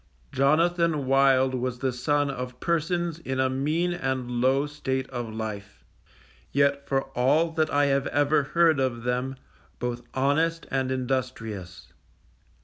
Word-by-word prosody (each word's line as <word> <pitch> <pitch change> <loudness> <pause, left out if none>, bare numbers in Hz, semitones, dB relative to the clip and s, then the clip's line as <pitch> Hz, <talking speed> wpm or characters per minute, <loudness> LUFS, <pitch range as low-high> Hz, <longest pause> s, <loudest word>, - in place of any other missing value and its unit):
Jonathan 155 +2 +2
Wild 135 -1 +4
was 125 -1 -2
the 130 +1 -1
son 145 +3 0
of 125 -1 -6
persons 170 0 -1
in 130 -5 -4
a 130 0 +2
mean 155 +7 0
and 130 -6 -2
low 135 +3 +3
state 135 -3 -3
of 120 -3 -4
life, 105 -2 -6 0.7
yet 140 0 +1
for 135 -1 +1
all 145 +7 +2
that 160 -1 0
I 145 0 +3
have 140 -1 +1
ever 145 +1 +2
heard 160 +1 +3
of 125 -3 -1
them, 125 +2 -1 0.4
both 120 0 -3
honest 160 +5 +1
and 130 -1 0
industrious. 125 -8 -4
135 Hz, 140 wpm, -26 LUFS, 125-150 Hz, 0.7 s, Wild